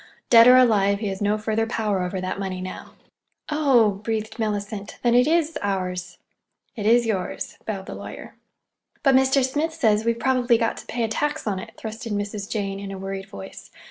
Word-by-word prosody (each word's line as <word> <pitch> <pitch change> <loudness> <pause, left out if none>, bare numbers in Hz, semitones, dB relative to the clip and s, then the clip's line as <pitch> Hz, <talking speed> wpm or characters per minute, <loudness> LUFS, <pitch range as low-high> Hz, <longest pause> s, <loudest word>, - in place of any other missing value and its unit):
Dead 230 0 +9
or 250 0 +9
alive, 205 -5 +4
he 210 -2 -2
has 195 +1 -5
no 205 +1 +2
further 220 +1 -1
power 215 -4 -1
over 180 +1 -3
that 185 +1 -4
money 190 -2 -3
now." 185 0 -8 0.6
"Oh 260 -9 +3
h!" - - -20
breathed 220 0 -3
Mellicent. 205 -1 -3
"Then 240 -1 +3
it 250 +2 +5
is—ours!" 195 - -1 0.6
"It 210 -2 -2
is 235 +1 +5
yours," 200 -5 -3
bowed 195 -3 -4
the - - -7
lawyer. - - -9 0.7
"But 275 - +5
Mr. 265 0 +4
Smith 300 +5 -2
says 215 -3 +2
we've 230 0 +1
probably 250 -2 +2
got 230 0 -1
to - - -10
pay 235 0 -2
a - - +1
tax 290 +7 -2
on 200 -3 -1
it," 225 +3 -9
thrust 220 +2 -7
in 210 - -2
Mrs. 205 0 -4
Jane, 195 -2 -3
in 200 0 -6
a 195 - -6
worried 195 0 -5
voice. 95 -1 -10
215 Hz, 200 wpm, -23 LUFS, 195-240 Hz, 0.7 s, Dead